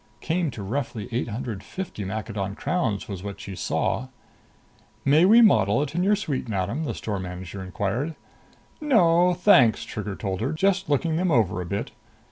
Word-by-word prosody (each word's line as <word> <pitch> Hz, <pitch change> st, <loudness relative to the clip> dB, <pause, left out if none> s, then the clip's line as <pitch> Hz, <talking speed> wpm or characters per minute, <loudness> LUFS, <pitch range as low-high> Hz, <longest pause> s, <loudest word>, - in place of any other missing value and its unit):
Came 170 Hz, 0 st, -1 dB
to 110 Hz, -5 st, -7 dB
roughly 115 Hz, -1 st, -3 dB
eight 120 Hz, +1 st, -1 dB
hundred 110 Hz, -2 st, -5 dB
fifty 165 Hz, -, -6 dB
Maccadon 100 Hz, 0 st, -4 dB
crowns, 140 Hz, -, -1 dB
was 95 Hz, -3 st, -6 dB
what 100 Hz, 0 st, -7 dB
she 100 Hz, -2 st, -7 dB
saw. 125 Hz, +7 st, -1 dB, 1.0 s
"May 150 Hz, +5 st, +5 dB
we 230 Hz, +5 st, +7 dB
model 110 Hz, -, +4 dB
it 150 Hz, -, -5 dB
in 175 Hz, -, 0 dB
your 200 Hz, +3 st, +4 dB
suite, 145 Hz, -, -3 dB
madam?" 105 Hz, +10 st, -2 dB
the -, -, -3 dB
store 105 Hz, -3 st, -3 dB
manager 90 Hz, +1 st, -7 dB
inquired. 105 Hz, -, -2 dB, 0.7 s
"No, 180 Hz, -, +4 dB
thanks," 135 Hz, -, +5 dB
Trigger 105 Hz, -2 st, -5 dB
told 95 Hz, -2 st, -3 dB
her. 135 Hz, +7 st, -1 dB
"Just 195 Hz, +3 st, +1 dB
looking 160 Hz, +3 st, +1 dB
them 180 Hz, +1 st, +1 dB
over 110 Hz, -, +2 dB
a 90 Hz, -, -6 dB
bit." 100 Hz, +3 st, -3 dB
120 Hz, 170 wpm, -25 LUFS, 100-165 Hz, 1.0 s, we